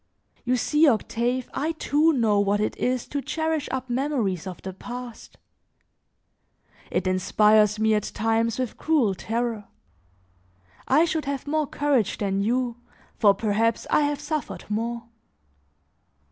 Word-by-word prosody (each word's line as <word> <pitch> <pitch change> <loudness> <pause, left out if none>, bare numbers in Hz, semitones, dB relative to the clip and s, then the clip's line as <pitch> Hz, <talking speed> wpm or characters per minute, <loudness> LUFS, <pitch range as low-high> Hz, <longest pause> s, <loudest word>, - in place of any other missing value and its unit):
You 250 +1 +2
see, 300 +6 +3
Octave, 240 +1 0
I 310 +5 -1
too 315 0 +2
know 225 -8 +2
what 200 +1 +2
it 210 - -1
is 250 -1 -1
to 285 - -3
cherish 315 +1 -2
up 260 0 -3
memories 240 - -1
of 185 - -7
the 190 - -5
past. 245 +3 -9 1.5
It 190 - -1
inspires 210 +3 +3
me 220 0 +2
at 210 -1 +1
times 225 +1 +1
with 255 -3 -3
cruel 285 -11 +2
terror; 225 +2 -3 1.2
I 300 +6 +5
should 320 -2 -2
have 275 -1 -3
more 305 0 0
courage 275 -9 0
than 195 -1 -1
you, 240 +2 0 0.4
for 205 -3 +5
perhaps 220 +2 0
I - - +4
have 290 -1 0
suffered 300 0 -4
more. 230 +2 -2
235 Hz, 135 wpm, -25 LUFS, 210-285 Hz, 1.5 s, I